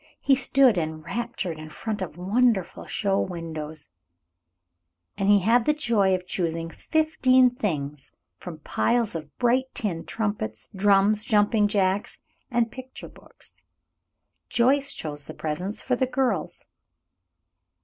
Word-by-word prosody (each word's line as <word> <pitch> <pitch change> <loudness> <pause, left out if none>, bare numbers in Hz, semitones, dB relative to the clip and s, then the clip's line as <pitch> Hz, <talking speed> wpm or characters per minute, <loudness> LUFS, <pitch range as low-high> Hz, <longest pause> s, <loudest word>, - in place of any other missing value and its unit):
He 275 - +3
stood 260 -5 +4
enraptured 170 +3 -4
in 155 0 -9
front 210 +6 -5
of 175 -3 -5
wonderful 205 +1 +1
show 195 -2 0
windows, 160 -3 -5 1.2
and 195 - 0
he 205 -1 +6
had 230 +4 +3
the 300 - +3
joy 215 -9 +2
of 180 0 -6
choosing 165 -2 -2
fifteen 260 - +3
things 150 - -4 0.3
from 175 -3 -8
piles 235 +6 +1
of 155 -3 -8
bright 250 +2 +2
tin 175 -7 -1
trumpets, 205 - -3
drums, 205 +2 +3
jumping 210 0 +3
jacks, 195 -1 0 0.3
and 240 -2 +1
picture 260 0 -10
books. - - -16 0.9
Joyce 275 +3 +3
chose 145 -2 -6
the - - -8
presents 180 +7 -3
for 255 - +1
the 260 +1 0
girls. 250 -11 -1
205 Hz, 125 wpm, -25 LUFS, 165-240 Hz, 1.2 s, he